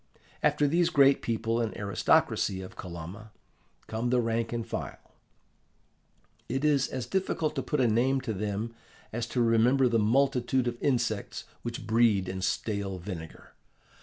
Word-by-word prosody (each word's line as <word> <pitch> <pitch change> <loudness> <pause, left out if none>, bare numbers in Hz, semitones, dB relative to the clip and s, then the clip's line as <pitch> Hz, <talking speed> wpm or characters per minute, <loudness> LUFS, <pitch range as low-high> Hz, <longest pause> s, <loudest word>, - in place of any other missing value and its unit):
After 145 - +3
these 170 +3 +2
great 140 -4 +5
people 115 0 -1
and 115 -2 -3
aristocracy 100 -1 +1
of 95 - -10
Kolomna, 90 +5 -8 0.6
come 115 +2 -2
the 125 0 +3
rank 115 -1 -1
and 120 -1 -3
file. 115 - -5 1.5
It 135 +4 -1
is 140 -4 +3
as 130 -2 -4
difficult 165 0 -1
to 135 - -2
put 150 - -2
a 125 - +4
name 125 +5 +2
to 115 -4 -3
them 105 +3 -3 0.4
as 120 +1 -2
to 120 +1 0
remember 120 +4 +4
the 115 -1 +2
multitude 125 +2 +2
of 120 0 -4
insects 120 -6 -1 0.2
which 120 -2 -5
breed 110 -3 +3
in 95 +1 -4
stale 100 -1 -2
vinegar. 85 -3 -8
115 Hz, 150 wpm, -29 LUFS, 105-130 Hz, 1.5 s, great